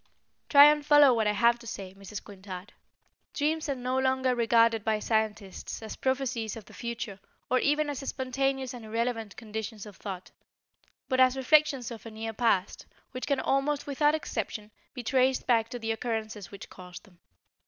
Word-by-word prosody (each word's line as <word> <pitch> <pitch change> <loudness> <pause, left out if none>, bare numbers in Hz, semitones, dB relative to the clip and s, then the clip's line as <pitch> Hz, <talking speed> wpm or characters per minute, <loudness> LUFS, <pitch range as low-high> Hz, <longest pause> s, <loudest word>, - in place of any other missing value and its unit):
Try 285 -1 +9
and 295 0 +5
follow 290 -3 +7
what 220 -2 +1
I 210 - +2
have 235 +3 +3
to 235 - -12
say, 190 -4 -7
Mrs. 195 +1 -8
Quintard. 195 0 -9 0.6
Dreams 310 +1 0
are 280 - 0
no 255 +1 -1
longer 260 -1 +2
regarded 230 -2 +3
by 220 0 +1
scientists 215 -3 -2
as 220 - -6
prophecies 260 -5 -1
of 220 -3 -10
the - - -16
future 230 -4 -5 0.3
or 255 - +4
even 295 +1 +2
as 285 -3 -3
spontaneous 270 -1 -2
and 245 -2 -9
irrelevant 225 -1 -3
conditions 220 -1 -6
of 205 -2 -12
thought, 190 -3 -7 0.8
but 260 -2 0
as 255 0 +5
reflections 275 -2 +3
of 230 - -8
a - - -6
near 220 0 -5
past, 205 -4 0 0.2
which 255 - -5
can 280 -2 +1
almost 275 +2 0
without 295 +2 +2
exception 220 -7 -4 0.2
be 250 - -5
traced 260 +2 +2
back 230 -2 +2
to 245 - -5
the 225 -1 -3
occurrences 220 -4 -4
which 200 - -10
caused 180 -1 -11
them. 180 -4 -22
235 Hz, 175 wpm, -28 LUFS, 215-265 Hz, 0.8 s, Try